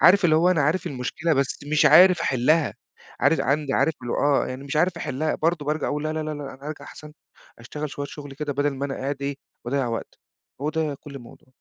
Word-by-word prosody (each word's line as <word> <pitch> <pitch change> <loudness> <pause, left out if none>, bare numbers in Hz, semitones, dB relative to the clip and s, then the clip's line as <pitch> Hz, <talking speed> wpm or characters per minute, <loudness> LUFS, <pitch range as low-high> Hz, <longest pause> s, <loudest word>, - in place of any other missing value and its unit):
عارف 185 +4 +7
اللي 155 -2 +5
هو 175 +3 +4
أنا 165 -5 +2
عارف 160 +6 +1
المشكلة 160 +3 -2
بس 135 -1 0
مش 155 - +5
عارف 180 -1 +7
احلّها، 145 +5 +2 0.5
عارز - - +3
عندي 140 0 0
عارف 160 - +2
اللي 120 - -3
هو - - -1 0.3
آه، - - -2
يعني 130 +2 -6
مش 140 +2 -4
عارف 175 +4 +2
احلّها 150 +4 -2
برضه 160 -2 0
بارجع 150 +1 -1
اقول 150 +1 -2
لا، 155 - -1
لا، 155 0 -2
لا، 155 - -4
لأ 145 -2 -6
أنا 135 +2 -12
هارجع 155 0 -6
احسن 150 0 -11 0.5
أشتغل 150 +6 -6
شوية 145 0 -5
شغل 145 -1 -9
كده 145 +1 -3
بدل 145 +1 +1
ما 135 +1 -4
أنا 135 - -4
قاعد 140 +1 -4
إيه 140 0 -2 0.3
باضيّع 130 +1 -1
وقت. 115 -1 -5 0.4
هو 150 +2 -1
ده 155 -2 -1
كل 145 - -11
الموضوع. 120 0 -14
145 Hz, 235 wpm, -24 LUFS, 135-155 Hz, 0.5 s, عارف